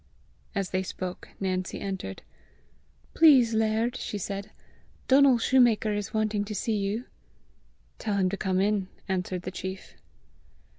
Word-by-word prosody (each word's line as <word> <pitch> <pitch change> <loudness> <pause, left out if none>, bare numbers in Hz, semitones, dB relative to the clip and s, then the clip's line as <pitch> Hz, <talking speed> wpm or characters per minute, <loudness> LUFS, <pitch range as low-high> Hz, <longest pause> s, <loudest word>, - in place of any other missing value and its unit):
As 195 -2 -2
they 185 - +1
spoke, 185 -1 -6
Nancy 185 -1 -2
entered. 190 - -5 0.9
"Please, 265 -8 +6
laird," 220 +2 +1
she 210 - -4
said, 200 +1 -5 0.6
"Donal 270 -1 +6
shoemaker 230 -3 +3
is 205 -1 -3
wanting 215 -1 0
to 210 0 -5
see 220 +3 -1
you." 205 +4 -2 0.9
"Tell 210 -2 -1
him 190 -2 +3
to - - -1
come 190 -1 0
in," 200 -1 +1 0.2
answered 180 -1 -2
the 185 - -4
chief. 190 0 -7
205 Hz, 135 wpm, -27 LUFS, 190-225 Hz, 0.9 s, Please